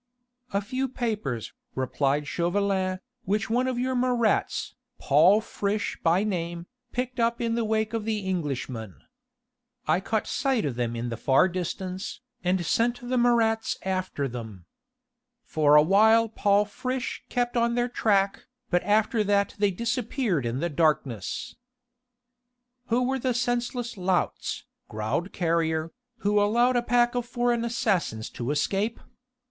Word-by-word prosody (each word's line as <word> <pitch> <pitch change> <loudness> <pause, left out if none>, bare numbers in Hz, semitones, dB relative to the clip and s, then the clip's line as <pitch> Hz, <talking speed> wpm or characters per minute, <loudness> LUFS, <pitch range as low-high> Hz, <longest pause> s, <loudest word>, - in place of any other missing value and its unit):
"A 200 - +1
few 260 +5 -2
papers," 210 - -3 0.2
replied 135 +3 0
Chauvelin, 185 +1 0 0.3
"which 210 +2 0
one 250 +2 +2
of 255 -2 -1
your 255 +1 0
Marats, 245 -3 +1 0.2
Paul 170 +9 +5
Friche 205 -1 -2
by 170 +4 +3
name, 170 -4 -3 0.3
picked 250 0 -3
up 235 0 +1
in 230 -1 0
the 235 0 0
wake 220 0 0
of 225 -2 -1
the 210 -3 -2
Englishmen. 130 - -3 0.9
I - - +3
caught 215 +3 -1
sight 265 -6 0
of 140 - -1
them 120 -1 -2
in 120 +1 -3
the 115 - -4
far 135 - +4
distance, 185 +1 -4 0.2
and 180 -1 +1
sent 240 +7 0
the 255 - +1
Marats 230 -2 +2
after 185 -7 -2
them. 110 -8 -8 0.8
For 150 -1 +3
awhile 215 +9 +6
Paul 205 -1 +2
Friche 255 +4 -4
kept 245 0 -1
on 235 0 +2
their 245 0 +1
track, 200 -5 +1 0.2
but 175 0 +3
after 215 +2 +2
that 200 0 +2
they 205 -1 +4
disappeared 230 - -1
in 120 +4 -2
the 170 - 0
darkness." 145 - -1 1.3
"Who 240 +2 +2
were 265 +1 0
the 255 -1 0
senseless 245 -1 -1
louts," 185 -1 -1 0.2
growled 110 - -2
Carrier, 165 -2 0 0.3
"who 205 0 +3
allowed 240 +5 +3
a 245 - +3
pack 240 0 +2
of 245 -1 -2
foreign 240 -1 0
assassins 200 - -1
to 120 +1 -4
escape? 195 +9 0
205 Hz, 140 wpm, -26 LUFS, 165-235 Hz, 1.3 s, awhile